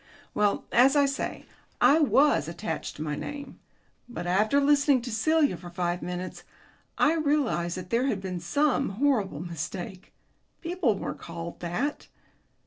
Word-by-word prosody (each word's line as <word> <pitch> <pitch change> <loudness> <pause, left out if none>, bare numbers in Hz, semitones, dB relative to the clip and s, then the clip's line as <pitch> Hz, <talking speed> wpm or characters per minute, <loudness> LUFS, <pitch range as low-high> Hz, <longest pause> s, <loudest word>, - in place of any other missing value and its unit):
Well, 205 -1 +1
as 265 +4 +5
I 285 -1 +5
say, 275 0 -3 0.3
I 305 - +6
was 290 - +4
attached 175 +6 -5
to 150 - -5
my 150 -1 -2
name. 285 - -7 0.5
But 175 -8 -6
after 210 +9 +3
listening 285 -2 +3
to 245 - -5
Celia 290 - +2
for 175 +1 -10
five 175 0 -2
minutes 180 +1 -5 0.6
I 305 - +4
realized 285 - 0
that 180 0 -8
there 240 +3 +2
had 220 -7 0
been 185 -2 -4
some 255 - +1
horrible 220 - +1
mistake. 175 +2 -6 0.5
People 335 - 0
weren't - - -5
called 170 0 -7
that. 180 - -3
220 Hz, 145 wpm, -27 LUFS, 175-285 Hz, 0.6 s, I